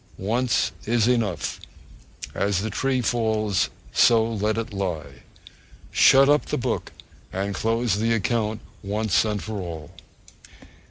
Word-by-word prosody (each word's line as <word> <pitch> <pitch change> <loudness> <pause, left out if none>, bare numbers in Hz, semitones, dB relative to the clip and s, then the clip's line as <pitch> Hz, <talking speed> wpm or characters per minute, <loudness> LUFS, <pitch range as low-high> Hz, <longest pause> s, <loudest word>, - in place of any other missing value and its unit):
Once 120 +6 0 0.2
is 115 0 +2
enough. 110 - 0 0.7
As 100 -1 0
the 110 +1 -3
tree 130 +4 0
falls, 110 -4 0 0.2
so 115 -2 +5
let 105 +1 0
it 115 -1 -4
lie. 90 -6 -4 0.7
Shut 135 +1 +6
up 145 +1 +3
the - - -1
book - - -2 0.4
and 100 +2 -2
close 115 0 0
the 115 +1 +1
account 110 0 0 0.2
once 105 0 0
for 105 0 -3
all! 80 -4 -7
110 Hz, 120 wpm, -24 LUFS, 100-115 Hz, 0.7 s, Shut